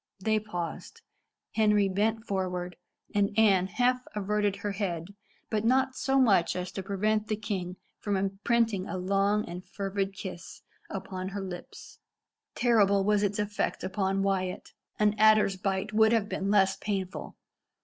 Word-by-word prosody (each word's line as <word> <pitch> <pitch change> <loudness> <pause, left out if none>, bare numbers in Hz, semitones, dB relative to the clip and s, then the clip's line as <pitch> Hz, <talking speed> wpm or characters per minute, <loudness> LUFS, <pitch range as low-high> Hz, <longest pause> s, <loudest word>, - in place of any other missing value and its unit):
They 215 +2 +1
paused. 210 - -6 0.5
Henry 210 -2 +3
bent 215 +4 0
forward, 180 -2 -2 0.4
and 205 0 +1
Anne 195 -4 +5
half 250 +5 +1
averted 205 0 0
her 200 +1 -3
head, 185 -2 -3 0.4
but 215 -1 0
not 260 +2 +2
so 270 0 +1
much 200 -9 +4
so 180 - -2
as 180 - -6
to 195 - -4
prevent 210 +2 0
the 215 - 0
king 195 -5 -4 0.2
from 205 -2 -1
imprinting 195 +1 0
a - - -4
long 200 +3 +1
and 175 +1 -7
fervid 195 0 -3
kiss 185 -2 -8 0.3
upon 190 -1 -5
her 200 +1 -4
lips. 180 -2 -9 0.6
Terrible 200 -5 +3
was 210 0 +2
its 205 -1 0
effect 210 0 -2
upon 195 0 0
Wyat. 185 -2 -2 0.2
An 210 -1 +3
adder's 215 -2 +5
bite 195 +2 -2
would 220 +1 +5
have 220 -3 +2
been 195 -1 -2
less 195 -2 +4
painful. 195 -3 -4
200 Hz, 150 wpm, -29 LUFS, 190-215 Hz, 0.6 s, Anne